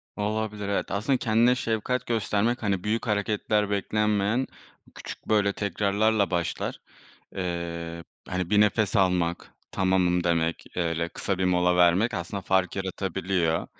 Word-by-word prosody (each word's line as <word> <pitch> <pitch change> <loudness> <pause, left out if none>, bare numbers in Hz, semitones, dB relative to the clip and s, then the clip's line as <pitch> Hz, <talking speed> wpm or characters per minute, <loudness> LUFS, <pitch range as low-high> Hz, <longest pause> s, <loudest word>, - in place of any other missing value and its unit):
Olabilir, 105 -1 -2
evet. 100 - -1
Aslında 115 +7 +1
kendine 115 +2 +3
şefkat 120 +1 -1
göstermek, 115 +1 0
hani, 100 -3 0
büyük 110 +3 -1
hareketler 105 0 0
beklenmeyen 105 +3 +1 0.5
küçük, - - -9
böyle, 105 -2 +3
tekrarlarla 100 +1 +1
başlar. 85 -1 -2 0.6
Eee, 85 -2 -4 0.2
hani, 90 -1 -2
bir 105 -1 +5
nefes 105 0 +2
almak, 90 -3 +1 0.2
tamamım 90 -2 +2
demek, 85 -1 0
öyle 85 -1 -1
kısa 95 +2 -3
bir 95 - +1
mola 90 -1 +3
vermek 90 +7 +4
aslında 85 +3 -4
fark 95 0 +1
yaratabiliyor. 95 -3 -1
100 Hz, 125 wpm, -26 LUFS, 90-105 Hz, 0.6 s, bir